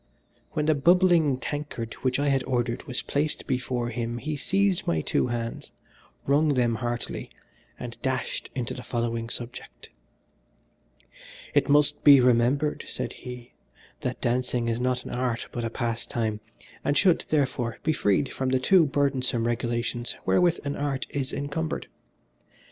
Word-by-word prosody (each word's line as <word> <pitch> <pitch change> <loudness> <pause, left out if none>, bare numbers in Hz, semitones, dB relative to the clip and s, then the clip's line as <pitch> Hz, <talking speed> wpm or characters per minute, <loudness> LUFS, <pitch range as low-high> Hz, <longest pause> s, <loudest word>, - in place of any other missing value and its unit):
When 150 - 0
the 155 - +4
bubbling 170 -2 +4
tankard 130 -4 -4
which 130 -1 +1
I 145 0 +1
had 135 -1 +2
ordered 120 -2 -1
was 125 - -3
placed 150 +2 -1
before 125 -2 -1
him 120 0 -3
he 155 +5 -3
seized 195 +5 +1
my 80 -2 +1
two - - +1
hands, 115 -1 -4 0.5
wrung 145 +1 +3
them 120 -2 +2
heartily 120 +1 -3 0.5
and 120 -1 -7
dashed 130 -1 -2
into 125 -3 -2
the 125 - -7
following 115 -1 -2
subject 120 - -6 1.6
"It - - +3
must 145 0 +4
be 140 -2 +9
remembered," 125 +4 +2
said - - -4
he, 125 -1 -9 0.5
"that - - -3
dancing 125 0 0
is 115 +1 -1
not 125 0 0
an - - -6
art 125 -1 -1
but 120 - -4
a 115 - -1
pastime, 115 -2 -2 0.4
and 145 0 +1
should, 180 -1 +4
therefore, 130 -6 0
be 155 - +2
freed 105 +2 +1
from 130 -1 -1
the 130 - +3
too 170 +4 +5
burdensome 135 -4 +1
regulations 120 0 -1
wherewith 175 -1 +3
an 140 - -2
art 140 -2 -2
is 135 -2 -2
encumbered. 155 +3 -3
125 Hz, 150 wpm, -26 LUFS, 120-145 Hz, 1.6 s, be